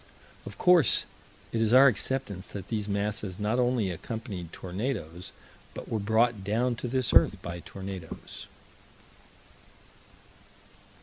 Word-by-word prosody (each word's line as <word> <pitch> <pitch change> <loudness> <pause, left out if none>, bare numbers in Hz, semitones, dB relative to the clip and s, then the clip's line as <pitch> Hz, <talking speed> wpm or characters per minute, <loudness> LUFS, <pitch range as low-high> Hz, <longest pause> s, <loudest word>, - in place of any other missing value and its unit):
Of - - -8
course 175 - +5 0.5
it 115 - -1
is 115 +1 +2
our 135 +2 +9
acceptance 110 -5 0
that 100 -3 -8
these 105 -3 -2
masses 100 -1 -2
not 105 +4 0
only 120 -6 +1
accompanied 95 -2 -6
tornadoes, 95 - -5 0.4
but - - -8
were 110 - -1
brought 110 0 +2
down 115 +5 +1
to 125 - -4
this 130 0 0
earth - - +5
by 85 0 -5
tornadoes. 95 -2 -8
105 Hz, 120 wpm, -28 LUFS, 95-120 Hz, 0.5 s, our